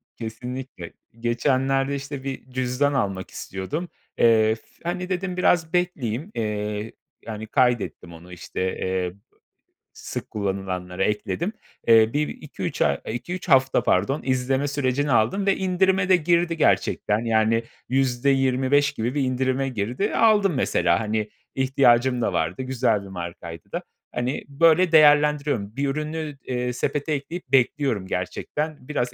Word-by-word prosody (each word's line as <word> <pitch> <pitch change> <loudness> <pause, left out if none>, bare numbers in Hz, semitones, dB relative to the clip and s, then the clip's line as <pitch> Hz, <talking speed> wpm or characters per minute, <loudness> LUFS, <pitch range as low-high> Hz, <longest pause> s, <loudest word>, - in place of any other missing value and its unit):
kesinlikle. 125 -4 -7 0.3
Geçenlerde 135 +3 +1
işte 140 -1 -6
bir 135 -1 -6
cüzdan 130 +3 0
almak 95 -8 -1
istiyordum. 145 - -5 0.3
Eee, 110 -1 +4
f 110 - -18 0.2
hani, 180 +2 -3
dedim 185 -1 -2
biraz 165 -3 +2
bekleyeyim. 165 - -1
Eee, 105 0 -3 0.3
yani, 110 -1 -6
kaydettim 120 -8 0
onu, 85 +2 -12
işte, 90 - -6
eee, 95 -1 -1 0.8
sık - - -7
kullanılanlara 95 -2 -3
ekledim. 170 - -1 0.3
Eee, 115 -1 +6
bir 150 +1 +1
2-3 - - -6
ay 70 - +3
2-3 175 +10 -5
hafta 130 -1 +4
pardon, 100 +11 +1
izleme 130 +2 0
sürecini 140 0 0
aldım 120 - +2
ve 195 - +3
indirime 190 0 +2
de 185 - +7
girdi 170 0 +1
gerçekten, 105 -8 +2
yani, 115 0 +2 0.3
%25 135 +2 +2
gibi 120 0 -3
bir 145 - +1
indirime 130 +1 0
girdi. 120 - -2
Aldım, 210 -4 +4
mesela, 85 -9 +2
hani, 110 -1 -2 0.3
ihtiyacım 130 -2 +3
da 100 - 0
vardı. 85 +5 -1
Güzel 130 -5 +1
bir - - -10
markaydı 85 -2 -8
da, - - -3 0.3
hani, 125 +3 -2
böyle 165 +4 +4
değerlendiriyorum. 150 -7 +4
Bir 140 +1 0
ürünü, 155 0 -4
eee, 125 -1 -2
sepete 145 +5 -1
ekleyip 145 +1 -5
bekliyorum 130 -5 +2
gerçekten 145 - -4
biraz 125 -5 -2
130 Hz, 130 wpm, -24 LUFS, 110-150 Hz, 0.8 s, de